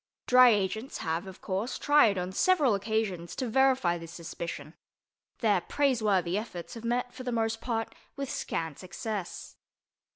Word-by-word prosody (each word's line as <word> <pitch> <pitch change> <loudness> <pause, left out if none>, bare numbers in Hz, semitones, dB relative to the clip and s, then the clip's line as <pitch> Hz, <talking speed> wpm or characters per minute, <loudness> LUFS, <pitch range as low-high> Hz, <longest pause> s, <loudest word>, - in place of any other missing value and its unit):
Dry 250 0 +7
agents 215 +3 0
have, 165 +3 -2
of 190 - -11
course, 195 +6 -2
tried 290 -9 +4
on 180 +1 -2
several 295 - +3
occasions 200 -4 -2
to 255 - -2
verify 255 -8 +3
this 165 0 -9
suspicion; 170 -2 -7 0.7
their 205 -6 +3
praiseworthy 210 -10 +1
efforts 180 -6 -7
have 230 - -8
met, 245 +1 -1
for - - -9
the 250 -1 -3
most 225 -1 -1
part, 225 -2 -2 0.2
with 275 0 -4
scant 165 - -3
success. 190 +1 -6
220 Hz, 150 wpm, -29 LUFS, 180-245 Hz, 0.7 s, Dry